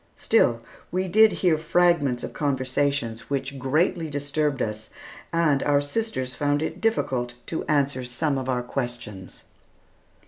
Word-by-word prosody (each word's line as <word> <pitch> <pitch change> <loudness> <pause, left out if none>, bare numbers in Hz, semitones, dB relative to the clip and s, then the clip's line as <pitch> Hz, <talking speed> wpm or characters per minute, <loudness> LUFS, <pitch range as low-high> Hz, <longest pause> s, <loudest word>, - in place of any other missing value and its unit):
Still 120 - +2 0.3
we 185 +1 -1
did 215 +4 +6
hear 170 -4 +2
fragments 160 -6 +2
of - - -5
conversations 130 -4 -1
which 135 0 -3
greatly 155 +5 +1
disturbed 145 0 -1
us, 110 -1 -3 0.4
and 160 -5 +2
our 145 -1 +3
sisters 145 - -2
found 145 +2 0
it - - -4
difficult 130 - 0
to 160 - -3
answer 140 -3 +1
some 135 +3 -1
of 130 0 -4
our 125 -1 0
questions. 120 -7 -5
140 Hz, 135 wpm, -25 LUFS, 125-160 Hz, 0.4 s, did